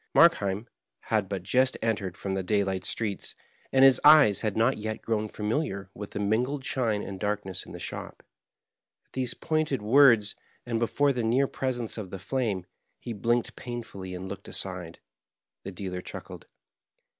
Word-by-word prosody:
Markheim 105 - +4 0.4
had 105 -4 +2
but 95 -3 -3
just 130 +7 +2
entered 105 -5 -1
from 95 - -3
the 95 - 0
daylight 95 -1 0
streets, 105 -4 -3 0.4
and 135 0 +6
his 130 -2 +6
eyes 150 -9 +7
had 110 -2 -1
not 115 +3 +3
yet 110 +1 -4
grown 110 -1 -1
familiar 105 - -2
with 105 0 -7
the - - -5
mingled 125 +7 0
shine 115 -7 0
and 95 -1 -6
darkness 105 -2 -2
in - - -10
the - - -7
shop. - - -7 0.8
At - - -44
these 130 -2 -1
pointed 155 -7 -1
words, 115 -3 +6 0.3
and 115 -2 -1
before 140 +4 +2
the 125 - -1
near 120 +5 +3
presence 120 -4 -3
of 100 -4 -6
the 95 - -6
flame, 105 -3 -2 0.3
he 120 - -5
blinked 120 +3 0
painfully 110 -7 -6
and 90 +1 -6
looked 100 +1 -8
aside. 90 -3 -5 0.6
The 95 - -7
dealer 90 -1 -5
chuckled. - - -9
110 Hz, 165 wpm, -28 LUFS, 100-125 Hz, 0.8 s, eyes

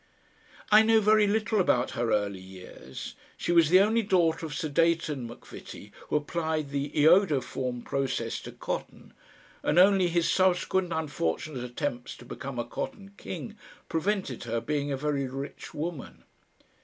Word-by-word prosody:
I 215 +1 +9
know 220 0 +5
very 215 0 +4
little 220 +1 +1
about 125 -8 +2
her 120 -1 -1
early 100 -2 0
years. 95 -8 -9 0.2
She - - -2
was 170 -3 +5
the 185 +2 +7
only 220 +3 +3
daughter 170 -5 +1
of 145 - -7
Sir 155 - -2
Deighton 155 -4 +1
Macvitie, 120 - -11 0.2
who - - 0
applied 155 -1 -1
the 140 0 -2
iodoform 145 -7 +2
process 130 -4 -2
to - - -9
cotton, - - -6 0.5
and 150 - 0
only 190 0 +6
his 170 -1 +1
subsequent 185 -1 +2
unfortunate 145 - -2
attempts 125 0 -4
to 120 - -13
become 130 +1 -7
a 120 - -2
Cotton 195 - -6
King 200 +3 -7 0.3
prevented 165 - -1
her 115 0 -1
being 145 +3 -2
a 135 - -1
very 140 -1 -1
rich 135 +2 -7
woman. 160 -2 -6
155 Hz, 150 wpm, -28 LUFS, 130-185 Hz, 0.5 s, I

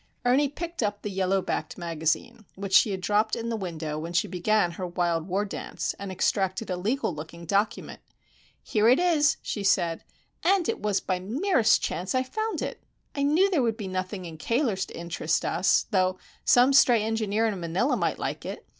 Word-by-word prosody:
Ernie 270 +3 +3
picked 340 +3 -5
up 205 -2 -2
the 210 - -3
yellow 190 0 +1
backed - - -3
magazine, 170 +7 -2
which 195 0 -6
she 210 - +6
had 190 -2 -3
dropped 210 +3 +1
in 230 0 -4
the 230 - -1
window 160 -6 -4
when 165 +2 -6
she 175 - +2
began 180 0 +1
her 180 +2 -5
wild 175 -2 -1
war 195 +3 0
dance, 200 - -4
and 200 -1 -5
extracted 190 +2 0
a - - 0
legal 205 +3 -1
looking 160 +3 -9
document. 200 +5 -1 0.6
"Here 215 +1 +2
it 255 - +6
is," 320 -4 +3
she 205 - -3
said; 170 -4 +1 0.4
"and 370 -1 +3
it - - -2
was 205 -2 0
by 185 -1 -1
the 185 - -11
merest 255 - +2
chance 180 +8 -2
I 255 - +2
found 435 +11 -3
it. - - -5 0.3
I 280 - -3
knew 310 +7 +4
there 325 -7 +2
would 230 -3 0
be 205 - -5
nothing 185 0 -4
in 160 -2 -9
Cayler's 230 - 0
to - - -10
interest 170 -1 -1
us, 185 +3 +2
though 185 -2 +2 0.3
some 250 +3 +5
stray 240 -5 +5
engineer 220 0 0
in 210 -4 -1
Manila 175 - 0
might - - -1
like - - -4
it. - - -7
200 Hz, 200 wpm, -26 LUFS, 180-240 Hz, 0.6 s, she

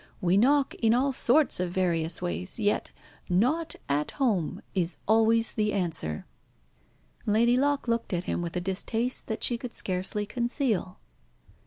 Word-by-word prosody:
We 180 +1 +2
knock 270 +6 +3
in 225 0 +4
all 270 +2 +1
sorts 265 - +3
of 180 -1 -1
various 170 -2 -1
ways. 180 +1 -4
Yet 205 -1 0 0.4
'not 255 - +1
at 145 +1 0
home' 215 - 0
is 175 -3 -1
always 225 +1 +4
the 210 -1 0
answer." 165 - -2 1.0
Lady 230 +3 +4
Locke 280 +1 +1
looked 230 0 -1
at 175 -1 -1
him 180 - -2
with 170 0 -5
a - - -1
distaste 220 +6 -2
that 220 - -3
she 240 -1 +2
could 245 -1 -7
scarcely 190 +3 0
conceal. 235 - -1
215 Hz, 150 wpm, -27 LUFS, 180-240 Hz, 1.0 s, in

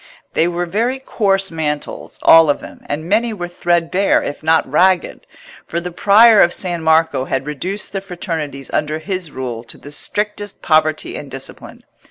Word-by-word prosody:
They 165 - +2
were 175 0 -2
very 230 +9 -1
coarse 195 -7 0
mantles, 150 -2 -4
all 165 -1 +7
of 145 - +1
them, - - -12
and 150 +2 -3
many 225 +4 +1
were 175 -3 -4
threadbare, 175 +2 +1
if 145 - -5
not 160 +1 +2
ragged; 180 +6 +1 0.4
for 170 - -2
the 180 +1 -6
Prior 210 +4 +6
of 175 - +4
San 175 -3 -2
Marco 160 -4 +2
had 135 0 -2
reduced 180 +8 -4
the 195 - -3
fraternities 160 -7 -5
under 150 +1 0
his 180 +1 -4
rule 125 -5 -5
to - - -10
the 145 - -12
strictest 205 +5 -3
poverty 155 -1 +1
and 145 - -7
discipline. 135 0 -9
170 Hz, 170 wpm, -18 LUFS, 150-195 Hz, 0.4 s, all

